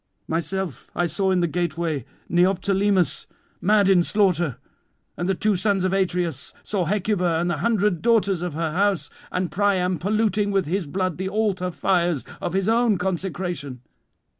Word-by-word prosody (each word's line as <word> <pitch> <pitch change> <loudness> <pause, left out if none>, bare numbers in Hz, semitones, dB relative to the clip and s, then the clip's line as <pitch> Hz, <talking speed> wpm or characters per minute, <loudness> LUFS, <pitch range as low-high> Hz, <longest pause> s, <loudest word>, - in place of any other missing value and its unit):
Myself 170 -2 -3
I 175 - +1
saw 180 +4 0
in 185 -1 +2
the 170 - +2
gateway 165 -4 -2 0.2
Neoptolemus 190 0 +2 0.3
mad 205 0 +4
in 190 -2 +5
slaughter, 175 - +2 0.6
and 175 +2 -2
the 195 - +2
two 210 +2 +1
sons 195 0 +1
of 185 0 +1
Atreus, 175 -7 -1
saw 195 -4 -1
Hecuba 180 -2 +1
and 175 +1 0
the 165 - -1
hundred 205 -1 +1
daughters 205 -6 +2
of 175 -4 -4
her 165 -1 -1
house, 195 +2 0 0.2
and 180 -3 -2
Priam 185 -2 +1
polluting 210 +2 +1
with 195 -2 +1
his 175 +1 -2
blood 185 +1 -2
the 190 0 -2
altar 195 -3 0
fires 175 -4 0 0.2
of 175 - -3
his 195 0 0
own 230 -2 +3
consecration. 175 -7 -3
185 Hz, 160 wpm, -23 LUFS, 170-200 Hz, 0.6 s, in